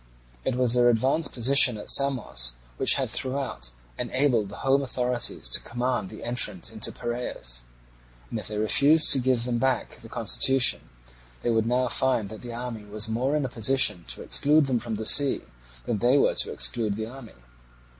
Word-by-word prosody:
It 125 Hz, -, -2 dB
was 125 Hz, -2 st, +1 dB
their 120 Hz, -1 st, +4 dB
advanced 130 Hz, +7 st, 0 dB
position 125 Hz, -1 st, +4 dB
at 105 Hz, -, -10 dB
Samos 120 Hz, -, +3 dB, 0.2 s
which -, -, +4 dB
had -, -, -2 dB
throughout 130 Hz, -, -4 dB, 0.3 s
enabled 125 Hz, -7 st, 0 dB
the 100 Hz, -, -10 dB
home 135 Hz, +1 st, +3 dB
authorities 125 Hz, -, -2 dB
to -, -, +2 dB
command 120 Hz, -4 st, -3 dB
the -, -, -11 dB
entrance 115 Hz, -6 st, -1 dB
into -, -, -2 dB
Piraeus; -, -, -4 dB, 0.7 s
and 115 Hz, -, -3 dB
if -, -, -5 dB
they 105 Hz, -, -6 dB
refused 140 Hz, +9 st, +5 dB
to 135 Hz, -, +5 dB
give 125 Hz, -2 st, +1 dB
them 120 Hz, -1 st, -2 dB
back 130 Hz, -1 st, -2 dB
the -, -, -14 dB
constitution, 135 Hz, -1 st, +2 dB, 0.5 s
they 120 Hz, -, 0 dB
would 110 Hz, 0 st, 0 dB
now 125 Hz, +1 st, 0 dB
find 120 Hz, -4 st, 0 dB
that 110 Hz, -, -10 dB
the 120 Hz, -, -8 dB
army 120 Hz, -2 st, -7 dB
was 105 Hz, +1 st, -4 dB
more 125 Hz, +6 st, -1 dB
in 150 Hz, -2 st, -1 dB
a -, -, -2 dB
position 115 Hz, -6 st, +1 dB
to -, -, -4 dB
exclude 150 Hz, +1 st, +2 dB
them 130 Hz, -3 st, -1 dB
from 115 Hz, -1 st, -5 dB
the 110 Hz, +1 st, -6 dB
sea 140 Hz, +3 st, +6 dB, 0.4 s
than 105 Hz, -, -2 dB
they 125 Hz, +5 st, +3 dB
were -, -, +2 dB
to -, -, -1 dB
exclude 100 Hz, -, +1 dB
the 110 Hz, +1 st, -5 dB
army. 120 Hz, 0 st, -12 dB
120 Hz, 185 wpm, -25 LUFS, 110-130 Hz, 0.7 s, sea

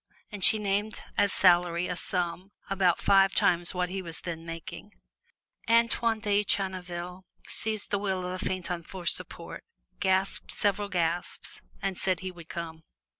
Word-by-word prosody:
And 205 Hz, -2 st, -5 dB
she 220 Hz, -, +9 dB
named 210 Hz, +1 st, -2 dB
as 205 Hz, -1 st, +3 dB
salary 175 Hz, -1 st, +3 dB
a 180 Hz, -, -3 dB
sum 180 Hz, +2 st, -2 dB, 0.2 s
about 185 Hz, -3 st, +3 dB
five 195 Hz, -1 st, +4 dB
times 175 Hz, 0 st, +2 dB
what 180 Hz, 0 st, 0 dB
he 190 Hz, +1 st, -3 dB
was 165 Hz, -3 st, -3 dB
then 165 Hz, -2 st, -5 dB
making. 165 Hz, +4 st, -8 dB, 0.8 s
Antoine 230 Hz, -1 st, +3 dB
de 205 Hz, -1 st, +2 dB
Channeville 180 Hz, -2 st, -2 dB, 0.2 s
seized 215 Hz, -1 st, 0 dB
the 205 Hz, -, +1 dB
wheel 190 Hz, -2 st, -2 dB
of 180 Hz, +1 st, -4 dB
the -, -, -3 dB
phaeton 180 Hz, -2 st, -2 dB
for 180 Hz, +1 st, -9 dB
support, -, -, 0 dB, 0.4 s
gasped 190 Hz, 0 st, 0 dB
several 205 Hz, 0 st, +1 dB
gasps, 175 Hz, -1 st, -2 dB, 0.2 s
and 190 Hz, -2 st, -2 dB
said 185 Hz, -3 st, 0 dB
he 185 Hz, 0 st, -4 dB
would 170 Hz, -2 st, -13 dB
come. 165 Hz, -2 st, -6 dB
185 Hz, 155 wpm, -28 LUFS, 175-200 Hz, 0.8 s, she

